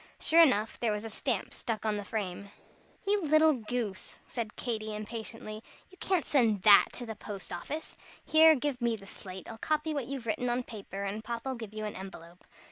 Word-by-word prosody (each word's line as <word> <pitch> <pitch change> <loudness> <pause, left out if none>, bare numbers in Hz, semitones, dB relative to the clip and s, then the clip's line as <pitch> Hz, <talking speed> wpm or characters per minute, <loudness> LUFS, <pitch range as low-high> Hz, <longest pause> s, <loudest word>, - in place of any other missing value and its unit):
Sure 330 +1 +6
enough, 225 -9 +3
there 235 -2 +1
was 210 0 -2
a 225 - -6
stamp 230 -2 -2
stuck 225 -2 -4
on 215 -1 +1
the 205 - -3
frame. 200 -2 -4 0.6
"You 405 0 +2
little 310 0 +5
goose!" 225 -5 -4
said 230 -4 -4
Katy, 220 -3 -3
impatiently, 215 0 -6 0.3
"you 375 - -16
can't 375 -4 +1
send 225 -9 +2
that 205 -2 +9
to 245 - -5
the 225 - -5
post 200 -2 -7
office. 300 - -5 0.3
Here, 315 0 +7
give 275 -2 -2
me 235 -1 +2
the 195 -3 -12
slate. 190 -1 -9
I'll 225 - -8
copy 310 +3 0
what 280 -5 -2
you've 270 -3 -5
written 230 +3 -1
on 245 +1 0
paper, 200 -3 -7
and 205 +2 -3
Papa'll 235 +3 -3
give 225 -4 -8
you 215 0 -3
an 210 - -5
envelope." 175 -2 -10
225 Hz, 200 wpm, -31 LUFS, 210-265 Hz, 0.6 s, that